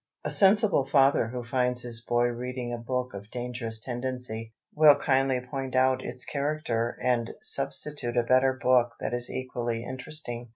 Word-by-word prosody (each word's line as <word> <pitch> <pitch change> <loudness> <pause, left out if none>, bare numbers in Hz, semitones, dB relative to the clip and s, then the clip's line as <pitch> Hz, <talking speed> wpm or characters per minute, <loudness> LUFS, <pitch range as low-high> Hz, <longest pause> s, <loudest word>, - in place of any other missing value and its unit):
A - - -1
sensible 200 - +4
father 135 -3 +4
who 125 +1 -5
finds 125 0 0
his 120 -1 -3
boy 120 0 +1
reading 125 0 -4
a - - -2
book 125 +2 -3
of 100 +1 -9
dangerous 120 -2 -4
tendency, 120 -2 -4 0.2
will 150 -1 +7
kindly 135 -1 +2
point 130 0 -5
out 130 0 +3
its 125 - -6
character 140 -5 -1
and 120 -2 +1
substitute 125 -5 -3
a 120 - +4
better 130 +2 +4
book 125 -2 +3
that - - -3
is 120 0 -1
equally 120 -3 -3
interesting. 125 -2 -5
125 Hz, 160 wpm, -28 LUFS, 120-130 Hz, 0.2 s, will